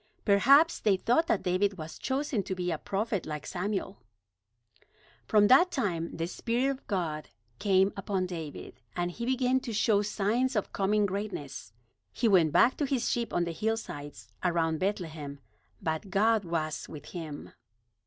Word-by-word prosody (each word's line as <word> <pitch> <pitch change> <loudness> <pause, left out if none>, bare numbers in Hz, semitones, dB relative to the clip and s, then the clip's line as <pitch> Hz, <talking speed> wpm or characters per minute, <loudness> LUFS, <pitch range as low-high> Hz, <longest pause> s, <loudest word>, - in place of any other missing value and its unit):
Perhaps 275 +11 +5
they 205 -3 +3
thought 250 - +2
that 340 - +1
David 190 +2 +1
was 160 -1 -8
chosen 265 -4 -1
to 190 0 -4
be 180 -1 -2
a 160 - -2
prophet 205 -2 -2
like 150 -2 -5
Samuel. 195 +1 -3 1.3
From 210 -1 +5
that 275 - +6
time 190 - -2
the 165 - -1
Spirit 240 +9 0
of 275 0 -8
God 165 -6 -2 0.3
came 195 -1 +3
upon 195 -2 -1
David, 160 -7 -7
and 175 0 -1
he 235 +6 -5
began 260 0 +2
to 245 - -6
show 215 -1 +3
signs 225 +5 0
of 210 - -1
coming 205 +1 +2
greatness. 195 - -5 0.4
He 235 - 0
went 175 -7 +5
back 250 - +4
to 295 - 0
his 265 -3 0
sheep 235 -1 -1
on 175 - +1
the 170 - -2
hillsides 185 -7 -4 0.2
around 165 -3 +1
Bethlehem, 160 -8 -3 0.4
but 160 +5 -3
God 210 +2 +3
was 155 -2 -3
with 150 - -10
him. 160 -5 -7
195 Hz, 160 wpm, -29 LUFS, 170-230 Hz, 1.3 s, that